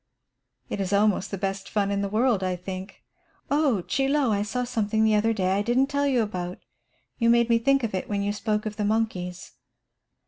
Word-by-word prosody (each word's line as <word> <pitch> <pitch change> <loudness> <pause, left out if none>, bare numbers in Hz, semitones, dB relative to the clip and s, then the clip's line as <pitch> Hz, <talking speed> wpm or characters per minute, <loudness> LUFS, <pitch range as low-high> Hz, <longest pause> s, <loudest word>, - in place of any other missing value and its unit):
"It 200 - -3
is 190 +1 -2
almost 200 -1 +2
the 200 - -4
best 195 0 -3
fun 200 -2 0
in 200 0 0
the 200 - -2
world, 220 0 +2
I 185 -1 0
think. 185 +2 -8 0.5
Oh, 285 - +2
Chie 270 +7 0
Lo, 280 -4 +2
I 200 -1 +1
saw 235 +4 -2
something 220 -3 0
the 220 0 +4
other 215 +2 +3
day 190 -4 0
I 195 +1 +2
didn't 250 +6 +1
tell 285 0 +1
you 250 -4 +2
about. 180 -4 -4 0.6
You 230 -1 +3
made 235 0 +4
me 230 - +4
think 275 +2 +2
of 225 - -2
it 185 - -3
when 200 -1 -1
you 205 +1 -1
spoke 210 0 -1
of 215 -1 -5
the 210 - -1
monkeys. 190 -4 -2
210 Hz, 215 wpm, -25 LUFS, 195-235 Hz, 0.6 s, the